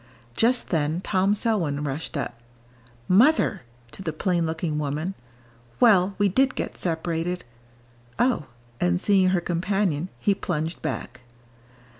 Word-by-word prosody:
Just 245 +2 +2
then 160 0 0
Tom 195 +1 +2
Selwyn 180 -11 0
rushed 150 +3 -4
up: 140 - -3 0.7
"Mother!" 220 - +4 0.3
to - - -9
the 165 - -2
plain 170 +1 0
looking 160 -1 -2
woman; 150 +5 -2 0.7
"well, 195 -4 +5
we 205 - +3
did 260 +7 +2
get - - -3
separated! 170 +1 -2 0.7
Oh!" 245 - +1 0.3
and 90 0 +2
seeing 190 -2 +4
her 185 -1 +2
companion 180 -1 -1
he 205 - +2
plunged 165 -4 -3
back. 125 +1 -5
180 Hz, 125 wpm, -25 LUFS, 155-200 Hz, 0.7 s, well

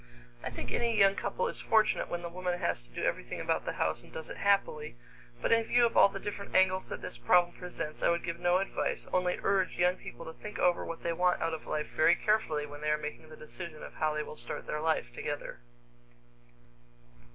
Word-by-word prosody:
I - - -2
think - - -5
any 235 -2 +1
young 195 -1 +6
couple 475 - -1
is - - -4
fortunate 220 -1 +3
when 175 0 -3
the - - -3
woman 180 0 -2
has 170 - -1
to - - -25
do - - -5
everything - - -2
about - - 0
the - - -2
house 80 0 0
and - - -17
does 160 - -6
it - - -7
happily, 155 -9 +1 0.5
but - - +1
in 230 0 +5
view 240 +1 +4
of 230 - -1
all - - +8
the 195 - -6
different 200 0 -6
angles 185 0 +4
that - - -6
this 180 - -4
problem 175 -1 +4
presents, 175 -4 -6
I - - +4
would 170 0 +1
give 170 0 -4
no 175 +1 +3
advice, 195 +1 -2
only 180 -1 +1
urge 195 -2 +1
young 180 +1 +3
people 120 - -9
to 160 - -7
think 210 +5 -8
over 175 -1 +3
what 165 - -6
they 170 - 0
want 180 +1 +2
out 165 - -1
of 160 - -6
life 150 0 -2
very 155 - +6
carefully 210 -9 +1
when 145 0 -10
they 150 - 0
are 150 - +3
making 150 +1 -7
the 155 - -11
decision 155 0 -8
of - - -9
how 155 -1 0
they 150 - -1
will 150 - -9
start 120 -2 -6
their 150 - -3
life 155 -7 0
together. 145 +3 -5
175 Hz, 230 wpm, -31 LUFS, 155-195 Hz, 0.5 s, all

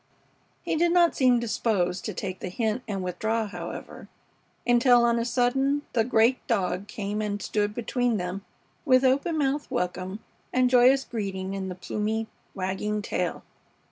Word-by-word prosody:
He - - -1
did 340 +2 +2
not 345 -1 +4
seem 250 -2 +4
disposed 200 -6 -1
to 215 - -3
take 185 +1 -4
the 185 - -5
hint 220 +4 -1
and 195 -3 -3
withdraw, 220 +5 -1
however, 205 - -8 0.6
until 245 0 +5
on 235 0 +2
a 230 - -1
sudden 270 +4 +1
the 230 - +3
great 235 +1 +3
dog 195 -3 0
came 205 0 -3
and 205 -1 -2
stood 210 0 -1
between 240 -1 0
them 180 +1 -4 0.4
with 255 -3 +4
open 280 +6 +2
mouthed 290 0 0
welcome 185 -4 -3 0.3
and 255 0 +2
joyous 255 +2 +5
greeting 195 -5 -4
in 190 -1 -4
the 180 - -5
plumy, 215 +4 -2 0.3
wagging 200 +2 -2
tail. - - -2
225 Hz, 155 wpm, -26 LUFS, 195-250 Hz, 0.6 s, until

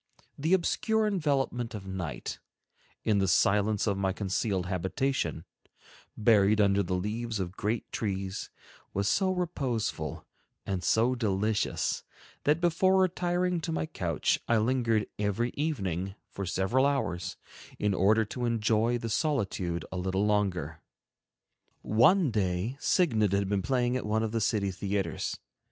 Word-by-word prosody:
The 160 +6 0
obscure 220 +4 +1
envelopment 140 - 0
of 100 -2 -7
night, 90 -8 -5 0.6
in 105 -2 +2
the 95 - +2
silence 105 +2 +3
of 100 -3 0
my 95 -1 +1
concealed 95 -1 -1
habitation, 95 - -1 0.7
buried 105 -1 +4
under 100 -1 +4
the 90 -1 -1
leaves 110 +4 -2
of 90 -2 -2
great 110 +2 -2
trees, 95 -2 -3 0.5
was 100 +1 +1
so 190 - +2
reposeful 145 - -2 0.4
and 95 -2 -2
so 115 +3 +3
delicious, 110 -2 0 0.4
that 150 +3 +3
before 180 +2 +3
retiring 180 -1 +1
to 165 - -3
my 160 - -1
couch 85 - 0
I 115 - +3
lingered 115 -1 +1
every 105 +4 0
evening 95 - -2 0.2
for 100 -2 -5
several 115 +10 +2
hours 90 -11 -2 0.4
in 105 -1 +1
order 105 +4 +3
to 120 +4 -4
enjoy 115 0 +2
the 115 - -5
solitude 105 - -1
a 95 - -4
little 95 +2 0
longer. 90 -7 0 1.0
One 140 - +4
day 100 +3 -1
"Signad" 110 - +2
had 100 0 +1
been 100 0 0
played 125 +3 +1
at 125 - -4
one 110 +1 +1
of 110 - -2
the 115 0 -1
city 105 -2 +1
theaters. 95 -2 -2
105 Hz, 140 wpm, -29 LUFS, 95-130 Hz, 1.0 s, buried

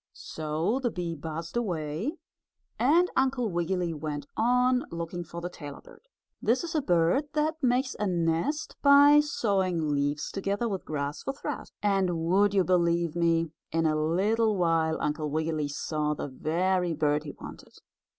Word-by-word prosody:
So 160 - -2
the 250 -2 0
bee 175 -5 -4
buzzed 160 +3 -6
away 185 - -2 0.6
and 335 +8 +4
Uncle 260 -3 +1
Wiggily 175 0 -1
went 150 -2 -5
on 250 +2 +3
looking 170 +1 -5
for 170 +1 -8
the 175 - -3
tailor 145 -4 -9
bird. - - -18 0.3
This 235 +7 +2
is 335 - -5
a 310 - +1
bird 175 - +2
that 310 +1 0
makes 255 0 +1
a 210 - 0
nest 170 - -1
by 285 +1 +7
sewing 190 - 0
leaves 145 +1 -1
together 200 +4 -1
with 195 -4 -4
grass 145 -1 -3
for 275 - -3
thread. 275 - -6
And 195 -4 +2
would 200 +2 +3
you 190 - +4
believe 170 -2 +1
me, 165 -1 +1 0.2
in 165 0 +1
a 155 -1 +2
little 200 +8 +1
while 165 -2 +2
Uncle 150 0 -2
Wiggily 155 0 -1
saw 150 +1 -2
the - - -4
very 175 +5 0
bird 150 -1 +1
he 145 - -7
wanted. - - -11
175 Hz, 160 wpm, -28 LUFS, 160-235 Hz, 0.6 s, by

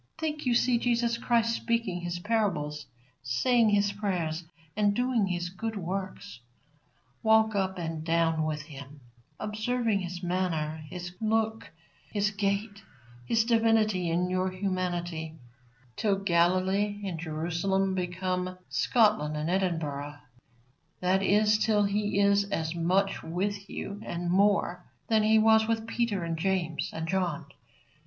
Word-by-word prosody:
Think 305 -3 -3
you 240 - +3
see 245 0 +3
Jesus 235 -1 +1
Christ 230 -1 +2
speaking 230 -8 -1
His 175 0 -3
parables, 175 -8 -1 0.3
saying 220 - +2
His 205 -1 +3
prayers, 180 -5 -2 0.3
and 205 -1 +2
doing 245 -4 +1
His 175 -1 -2
good 220 +5 -4
works. 190 -3 -5 0.8
Walk 220 0 +4
up 190 -2 -1
and 165 -2 -4
down 165 -1 +1
with 155 -1 -2
Him, 140 -1 -11 0.4
observing 215 0 0
His 180 -1 -6
manner, 165 -4 -1
His 175 -1 -6
look, 220 0 0 0.4
His 205 0 +1
gait, 200 0 -2 0.5
His 225 -1 +2
divinity 225 -6 +2
in 175 +2 +1
your 185 +1 0
humanity, 175 -4 -3 0.6
till 205 -2 +1
Galilee 190 +2 +1
and 175 -4 -4
Jerusalem 175 +4 -1
become 185 0 -2
Scotland 210 - +2
and 155 +3 -1
Edinburgh; 150 -6 -1 0.8
that 185 +1 +2
is, 210 +2 +3
till 210 -2 +3
He 205 0 0
is 200 0 +4
as 165 -5 -2
much 185 +4 +1
with 200 +4 -3
you, 200 +1 -6
and 175 0 -3
more, 190 -2 +2 0.3
than 220 -1 +4
He 215 +1 +4
was 220 0 +5
with 225 -1 0
Peter 225 -5 -1
and 165 -1 -2
James 175 -3 -1
and 160 0 -4
John. 180 -4 -1
190 Hz, 135 wpm, -28 LUFS, 175-215 Hz, 0.8 s, was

